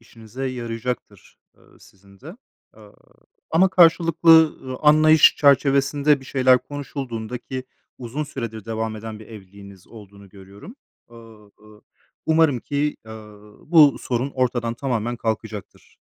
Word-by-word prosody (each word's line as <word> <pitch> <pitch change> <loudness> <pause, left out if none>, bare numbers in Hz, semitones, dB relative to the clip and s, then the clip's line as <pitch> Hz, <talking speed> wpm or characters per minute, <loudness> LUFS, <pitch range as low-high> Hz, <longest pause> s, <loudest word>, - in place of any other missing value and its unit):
işinize 115 +3 -9
yarayacaktır, 120 -1 -7 0.2
eee, - - -27 0.2
sizin 100 0 -22
de. 165 - -12 0.4
Aaa, 105 -1 -18 0.6
ama 180 +4 +3
karşılıklı, 165 -2 +4
ııı, 130 -1 -7
anlayış 155 +1 +5
çerçevesinde 140 0 +2
bir 135 - -14
şeyler 130 -1 +3
konuşulduğunda, 125 -5 -7
ki 130 +1 -7 0.3
uzun 130 +5 -5
süredir 115 -7 -7
devam 110 0 -4
eden 110 0 -8
bir 110 - -14
evliliğiniz 100 -3 -14
olduğunu 100 -3 -15
görüyorum, 100 - -15 0.3
aaa, 120 - -17 0.4
ııı, 105 0 -19 0.4
umarım 160 -4 +2
ki, 145 +1 -3
aaa, 110 -2 -13 0.3
bu 155 -5 +6
sorun 125 +2 -3
ortadan 120 -3 -2
tamamen 120 -2 -3
kalkacaktır. 110 -2 -6
125 Hz, 125 wpm, -21 LUFS, 110-145 Hz, 0.6 s, bu